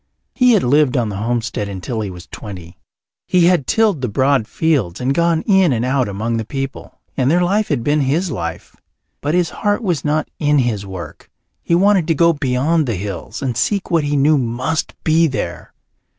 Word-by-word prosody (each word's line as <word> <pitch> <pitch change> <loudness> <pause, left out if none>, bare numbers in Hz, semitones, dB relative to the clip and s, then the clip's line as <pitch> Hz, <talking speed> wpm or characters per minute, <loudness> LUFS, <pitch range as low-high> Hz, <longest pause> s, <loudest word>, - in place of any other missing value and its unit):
He 250 -2 +4
had 210 - +3
lived 140 +1 +3
on 115 -3 0
the 100 - -5
homestead 115 -1 -2
until 100 +4 -4
he 105 - -3
was 90 -2 -10
twenty. 90 -5 -10 0.5
He 180 -2 +3
had 175 -7 +2
tilled 215 -10 +2
the 125 - -1
broad 130 +1 +1
fields 135 - 0
and 130 +2 0
gone 170 +1 +1
in 190 -6 +4
and 120 -1 0
out 130 -1 +1
among 110 +4 -2
the 110 - -2
people, 135 +4 -6 0.2
and 130 0 +1
their 175 +3 +3
life 205 +4 +1
had 135 -6 -1
been 145 +3 +2
his 155 +6 0
life. 85 - -5 0.5
But 150 +3 0
his 180 -2 +1
heart 205 +2 -1
was 175 -7 -1
not 155 +1 0
in 150 0 +2
his 110 -7 0
work. 85 -6 -9 0.3
He 170 - +1
wanted 190 -2 +3
to 165 - +2
go 170 +2 +4
beyond 145 +2 0
the 115 - -1
hills 100 +4 -6
and 125 -3 -2
seek 200 - -1
what 165 -3 +2
he 145 0 0
knew 145 +1 +4
must 125 +6 -2
be 160 +1 +3
there. 90 - -5
140 Hz, 200 wpm, -18 LUFS, 115-165 Hz, 0.5 s, He